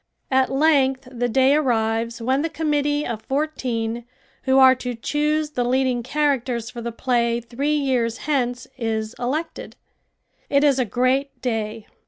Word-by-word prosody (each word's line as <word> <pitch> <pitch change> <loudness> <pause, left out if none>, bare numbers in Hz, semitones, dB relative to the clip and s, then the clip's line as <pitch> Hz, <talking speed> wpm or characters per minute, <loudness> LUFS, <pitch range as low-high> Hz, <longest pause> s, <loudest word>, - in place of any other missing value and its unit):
At 265 0 +3
length 270 -2 +2
the 245 -1 -1
day 265 +3 +4
arrives 230 -4 0
when 260 +4 +1
the 325 - -1
committee 295 -2 0
of 225 -2 -4
fourteen 240 -5 -2 0.4
who 265 0 +3
are 260 -1 +8
to 250 -1 -5
choose 300 +5 -1
the 250 -4 -1
leading 255 0 +1
characters 255 -4 -1
for 240 - -7
the 235 0 -4
play 235 -1 0
three 265 +6 -2
years 250 -5 -1
hence 255 -4 -1
is 220 -1 -2
elected. 295 +7 -4 0.7
It 280 0 +3
is 280 -3 +4
a 255 - +2
great 255 +5 0
day. 220 -2 -3
255 Hz, 150 wpm, -22 LUFS, 235-280 Hz, 0.7 s, are